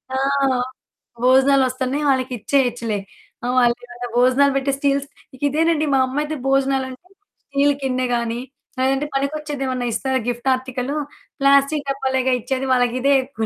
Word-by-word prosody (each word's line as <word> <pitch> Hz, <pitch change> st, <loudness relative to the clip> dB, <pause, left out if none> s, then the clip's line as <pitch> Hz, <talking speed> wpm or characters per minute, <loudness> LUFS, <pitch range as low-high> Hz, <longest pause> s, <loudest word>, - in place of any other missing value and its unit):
ఆ! -, -, +1 dB, 1.1 s
భోజనాలొస్తన్నయి 265 Hz, +1 st, +3 dB
వాళ్ళకిచ్చేయచ్చులే, 245 Hz, -3 st, 0 dB, 0.5 s
ఆహ్, 250 Hz, -, 0 dB
వాళ్ళు 240 Hz, -1 st, +4 dB
ఇవాళ 245 Hz, 0 st, -8 dB
భోజనాలు 260 Hz, +3 st, +4 dB
పెట్టే 275 Hz, 0 st, 0 dB
స్టీల్స్ 280 Hz, 0 st, 0 dB, 0.3 s
ఇక 255 Hz, -, -19 dB
ఇదేనండి 315 Hz, +1 st, +1 dB
మా 270 Hz, -, +4 dB
అమ్మ 260 Hz, +2 st, -5 dB
అయితే 310 Hz, +1 st, -4 dB
భోజనాలంటే, 270 Hz, +3 st, 0 dB, 0.4 s
స్టీల్ 280 Hz, +1 st, +2 dB
కిందే 255 Hz, -1 st, 0 dB
గాని, 235 Hz, 0 st, -2 dB, 0.4 s
లేదంటే 270 Hz, +2 st, +1 dB
పనికొచ్చేది 285 Hz, 0 st, -2 dB
ఏమన్నా 255 Hz, -1 st, -2 dB
ఇస్తారా, 265 Hz, +3 st, 0 dB
గిఫ్ట్ 240 Hz, +2 st, -2 dB
ఆర్టికలు, 260 Hz, +2 st, -4 dB, 0.4 s
ప్లాస్టికు 280 Hz, +1 st, +3 dB
డబ్బాలేగా 265 Hz, -1 st, 0 dB
ఇచ్చేది, 265 Hz, +2 st, -2 dB
వాళ్ళకిదే 250 Hz, +3 st, +2 dB
ఎక్కువలే 240 Hz, -4 st, -4 dB
265 Hz, 130 wpm, -21 LUFS, 255-280 Hz, 1.1 s, వాళ్ళు